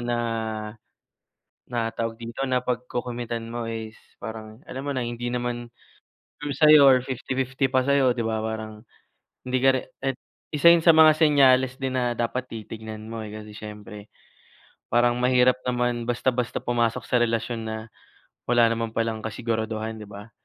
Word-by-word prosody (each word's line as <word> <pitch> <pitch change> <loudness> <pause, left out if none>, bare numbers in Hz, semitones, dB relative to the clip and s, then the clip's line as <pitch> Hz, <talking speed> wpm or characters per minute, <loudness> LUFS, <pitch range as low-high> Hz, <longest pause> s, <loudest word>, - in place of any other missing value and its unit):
na, 120 0 -1 1.5
na 115 -2 -2
tawag 115 0 -4
dito, 115 +4 -4
na 125 -1 +1
pagko-committan 120 -1 -4
mo 120 0 -4
is 110 -1 -6 0.2
parang 110 +1 -8
alam 130 +1 -5
mo 140 - -2
na 130 - -1
hindi 120 +1 -4
naman 120 -1 -3 0.6
sure 145 -1 -4
sayo 150 0 +7
or 130 -2 +7
50:50 130 +1 -3
pa 130 - +4
sa'yo, 135 -1 +3
'di 120 - -5
ba 110 -1 -1
parang 110 0 -5 0.6
hindi 130 0 +1
ka 135 - +5
re 130 - 0 0.2
at 135 -1 -1 0.3
isa 150 +2 0
yun 170 -1 +3
sa 165 - +7
mga 160 -1 +7
senyales 135 -4 +4
din 130 -1 -3
na 125 -1 +1
dapat 120 +2 -1
titignan 110 -1 -8
mo 115 0 -6
eh, 105 - -7
kasi 105 0 -9
siyempre 105 0 -10 0.8
parang 120 0 +3
mahirap 125 0 +4
naman 120 -1 0
basta-basta 120 0 -1
pumasok 120 -2 0
sa 125 - 0
relasyon 115 -1 -1
na 110 - -3 0.7
wala 120 -1 +4
naman 115 -1 -3
palang 115 -1 -1
kasiguraduhan, 110 -1 -3
'di 105 - -9
ba? 105 +2 -11
120 Hz, 160 wpm, -25 LUFS, 110-130 Hz, 1.5 s, sayo